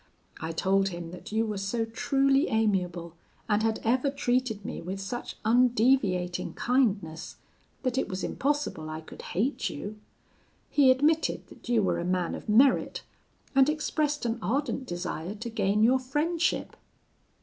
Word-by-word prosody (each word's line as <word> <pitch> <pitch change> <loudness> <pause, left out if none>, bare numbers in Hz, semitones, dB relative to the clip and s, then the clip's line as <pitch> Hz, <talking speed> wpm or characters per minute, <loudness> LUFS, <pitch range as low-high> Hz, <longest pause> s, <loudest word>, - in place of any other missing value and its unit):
I 160 +1 -4
told 195 +3 +2
him 170 -2 -7
that 180 - -10
you 220 +1 +1
were 210 -2 -3
so 225 +4 -1
truly 270 +5 +2
amiable, 180 -6 0 0.3
and 210 -1 +2
had 220 0 0
ever 250 +5 +2
treated 245 -6 -1
me - - -5
with 185 +3 -5
such 220 +5 -5
undeviating 225 -6 +2
kindness, 205 -11 0 0.5
that 255 0 0
it - - -2
was 185 -1 -4
impossible 285 - -1
I 155 0 -5
could 160 - -11
hate 220 +1 -1
you. 205 +8 -7 0.7
He 280 -3 +5
admitted 300 +5 +2
that - - -13
you 230 -3 +3
were - - +1
a - - -2
man 180 -1 0
of - - -7
merit, 250 +5 +4 0.5
and 270 +1 +5
expressed 300 -2 -1
an 235 0 -1
ardent 265 +4 -1
desire 175 +1 -4
to 230 +3 -6
gain 210 -1 +1
your 255 +3 +5
friendship. 310 +6 -1
225 Hz, 150 wpm, -28 LUFS, 190-260 Hz, 0.7 s, He